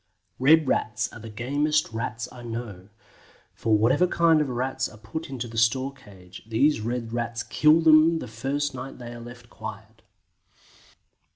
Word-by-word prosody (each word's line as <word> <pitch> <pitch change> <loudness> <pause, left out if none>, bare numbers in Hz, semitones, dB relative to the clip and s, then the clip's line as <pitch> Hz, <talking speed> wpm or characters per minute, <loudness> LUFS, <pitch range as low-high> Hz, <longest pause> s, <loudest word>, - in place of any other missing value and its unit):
Red 155 +3 +5
Rats 110 -1 -1
are - - -9
the 115 0 -9
"gameist" 145 +5 0
Rats 115 +1 -4
I 125 - -11
know, 115 -5 -7 0.6
for 110 -1 +1
whatever 115 +12 +3
kind 165 -3 +3
of 145 - -1
Rats 130 +1 -2
are 110 - -14
put 110 +10 -7
into 125 -3 -5
the 115 -1 -3
store 130 +5 +2
cage, 95 -8 -14
these 115 +3 +2
Red 115 0 -3
Rats 120 0 -2
kill 155 +2 +4
them 160 +1 +6
the - - -6
first 135 +6 -2
night 130 +1 -7
they 120 -1 -8
are 120 - -9
left 120 0 -12
quiet. 110 +1 -9
120 Hz, 165 wpm, -25 LUFS, 110-140 Hz, 0.6 s, them